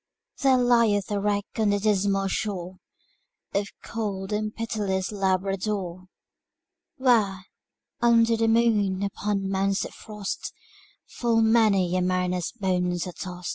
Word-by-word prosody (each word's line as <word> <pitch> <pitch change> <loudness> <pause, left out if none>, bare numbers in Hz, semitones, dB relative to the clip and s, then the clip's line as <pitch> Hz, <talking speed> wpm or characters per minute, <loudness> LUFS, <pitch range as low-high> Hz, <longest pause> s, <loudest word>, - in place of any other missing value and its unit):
There 265 -2 +5
lieth 230 -5 +3
a 205 - 0
wreck 205 0 0
on 215 -2 +3
the 205 - +2
dismal 200 -1 +1
shore 185 -2 -3 0.8
Of 200 0 0 0.2
cold 205 -3 -4
and 215 0 -1
pitiless 205 -5 -2
Labrador; 190 -1 -1 0.9
Where, 215 -8 +2 0.6
under 230 -1 +4
the 225 0 +1
moon, 215 -4 +2
upon 200 0 -2
mounts 195 0 0
of - - -9
frost, 210 -3 -6 0.5
Full 230 -2 +1
many 210 -5 +3
a 185 - +2
mariner's 180 -1 0
bones 180 -5 -1
are 180 - -5
tost. 180 -1 -6
200 Hz, 125 wpm, -25 LUFS, 190-220 Hz, 0.9 s, There